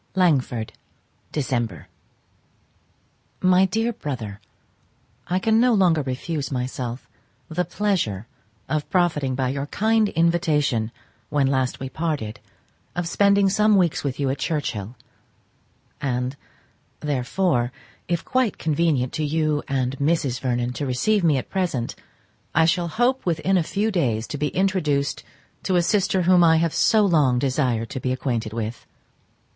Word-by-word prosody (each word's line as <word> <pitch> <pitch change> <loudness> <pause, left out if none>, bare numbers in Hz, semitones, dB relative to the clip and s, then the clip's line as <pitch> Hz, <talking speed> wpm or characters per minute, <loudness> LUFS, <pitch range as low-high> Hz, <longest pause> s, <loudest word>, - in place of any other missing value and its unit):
_ - - -41
Langford, 135 -11 +1 0.6
Dec. 120 - -2 1.5
MY 185 +1 +4
DEAR 225 +5 0
BROTHER,—I 120 - -8
can 220 +4 +3
no 245 -1 +4
longer 175 -6 +3
refuse 140 +2 -3
myself 125 -1 -4 0.4
the 175 +3 0
pleasure 175 - -1 0.4
of 155 -1 -2
profiting 155 -8 +1
by 130 -1 0
your 140 +2 -3
kind 220 +4 +2
invitation 150 - +1 0.4
when 145 -2 +2
we 135 - +1
last 130 -2 0 0.2
parted 150 -10 -3 0.6
of 175 -1 -2
spending 200 +2 +3
some 210 +2 +3
weeks 175 -5 +2
with 140 -1 -3
you 135 -2 +1
at 135 - -4
Churchhill, 125 - -3 1.1
and, 125 -1 -1 0.7
therefore, 135 -1 0 0.4
if 170 -1 -1
quite 255 -5 +1
convenient 150 -5 0
to 155 - -2
you 150 0 0
and 135 -1 -1
Mrs. 145 -4 +1
Vernon 125 -1 -1
to 140 +2 -3
receive 190 +11 +1
me 155 -5 +4
at 130 - -5
present, 170 -11 -1 0.6
I 160 +1 +5
shall 170 +1 +1
hope 245 +8 +1
within 175 +3 +1
a 180 - +4
few 205 +7 -1
days 120 - 0
to 145 - -4
be 150 - +1
introduced 155 -7 0 0.4
to 185 - 0
a 175 - +4
sister 190 0 +2
whom 180 0 +5
I 160 -1 +5
have 165 -1 +1
so 220 -3 +4
long 150 -9 +3
desired 125 -4 0
to - - -4
be 125 0 -2
acquainted 120 -4 -2
with. 115 +1 -5
150 Hz, 140 wpm, -23 LUFS, 125-180 Hz, 1.5 s, I